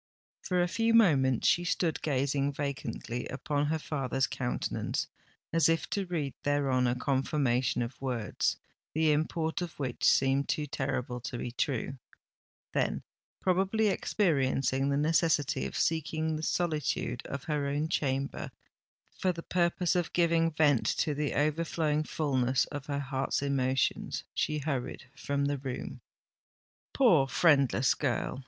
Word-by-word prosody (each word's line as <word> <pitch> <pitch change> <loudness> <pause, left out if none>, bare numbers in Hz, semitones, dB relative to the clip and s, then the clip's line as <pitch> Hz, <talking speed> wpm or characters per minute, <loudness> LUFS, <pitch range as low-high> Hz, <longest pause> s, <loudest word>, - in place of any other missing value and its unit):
For 180 -1 +1
a - - +1
few 230 +5 +1
moments 135 - +4
she 175 - +3
stood 175 -3 0
gazing 140 0 0
vacantly 135 -4 -4
upon 145 +2 -1
her 160 +2 0
father's 135 -4 -1
countenance, 125 -2 -2 0.5
as 165 0 +4
if 165 -4 +1
to 200 -2 -1
read 155 -6 -2
thereon 135 -3 +1
a 120 - +1
confirmation 130 -2 +1
of 120 +3 -8
words, 120 -6 -1 0.4
the 160 -1 +3
import 160 +2 0
of 175 -2 -5
which 130 -4 -4
seemed 135 +1 +3
too 150 - 0
terrible 130 -3 -3
to 120 +1 -5
be 120 - -4
true: 135 +1 -2 0.7
then, - - 0 0.4
probably 195 +4 +2
experiencing 135 - +1
the 140 - +1
necessity 155 -1 +2
of - - -6
seeking 160 0 0
the 155 - -4
solitude 155 -6 -1
of 140 -2 -5
her 150 -2 -1
own 145 +2 -1
chamber 140 -4 -1 0.7
for 185 - +2
the 165 -1 -7
purpose 175 0 +1
of 175 -2 -1
giving 165 -1 +3
vent 150 -5 +2
to 155 - +1
the 145 0 -2
overflowing 155 0 +1
fulness 130 -5 +1
of 145 -2 -6
her 140 -1 -2
heart's 135 0 -1
emotions, 135 -1 0
she 155 -1 0
hurried 135 -4 -3
from 140 0 -1
the 140 -1 -1
room. 130 -2 -6 0.9
Poor 175 - +4
friendless 135 -4 +3
girl! 130 -2 -2
145 Hz, 140 wpm, -30 LUFS, 135-160 Hz, 0.9 s, moments